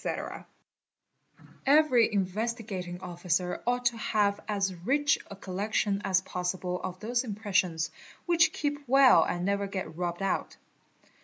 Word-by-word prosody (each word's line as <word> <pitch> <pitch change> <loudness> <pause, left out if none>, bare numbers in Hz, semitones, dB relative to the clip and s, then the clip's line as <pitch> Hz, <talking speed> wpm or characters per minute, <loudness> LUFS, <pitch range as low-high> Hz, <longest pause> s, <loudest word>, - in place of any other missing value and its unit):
_ - - -4 1.2
Every 270 -5 +5
Investigating 200 -2 -3
Officer 180 0 -2
ought 245 0 0
to 240 -1 +2
have 205 -2 +1
as 200 -3 0
rich 280 +12 +1
a 200 - -8
collection 200 +1 -1
as 185 -1 +2
% 185 - -17
ossible 180 0 -2
of 185 -1 -5
those 240 +3 0
impressions, 185 -7 -1 0.3
which 340 -2 +4
keep 290 -1 -2
well 270 +1 +7
and 175 0 -2
never 200 0 0
get 190 -4 -5
rubbed 175 +2 -3
out. 195 - -2
200 Hz, 135 wpm, -29 LUFS, 180-235 Hz, 1.2 s, well